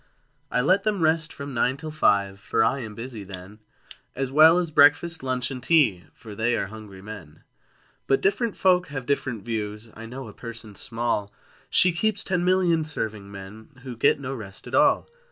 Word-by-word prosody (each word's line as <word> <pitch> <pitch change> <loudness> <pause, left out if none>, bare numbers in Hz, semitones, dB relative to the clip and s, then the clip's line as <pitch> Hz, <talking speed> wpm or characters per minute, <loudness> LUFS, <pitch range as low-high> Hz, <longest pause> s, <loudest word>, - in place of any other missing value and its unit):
I 125 - +1
let 185 +9 +3
them 205 -3 -1
rest 160 0 +2
from 140 0 -7
nine 125 +2 +1
till 155 +2 -7
five. 100 -9 +2
For 110 - +1
I 135 +5 +1
am 110 -4 -7
busy 115 -2 -7
then, 95 +2 -10 0.6
As 135 0 -2
well 160 +4 +7
as 175 -3 -1
breakfast, 150 +3 +4
lunch, 130 0 -2
and 130 -2 -6
tea, 120 - +3
For 110 -3 -11
they 115 +3 0
are - - -1
hungry 100 -3 -11
men: 95 -8 -10 0.6
But 135 - +3
different 205 +3 0
folk 180 -1 +3
have 135 -4 -6
different 125 -5 -2
views: 110 -1 -4
I 115 +1 -9
know 130 +1 -8
a 105 - -11
person 115 -3 -8
small 115 -3 -2 0.4
She 180 - +5
keeps 215 +6 -1
ten 180 -2 -1
million 180 -3 +3
serving 110 -9 -5
men, 105 +7 -11
Who 130 -2 -7
get 115 +5 +3
no 135 -1 -5
rest 100 -6 -8
at - - -10
all! - - +4
125 Hz, 190 wpm, -25 LUFS, 105-155 Hz, 0.6 s, well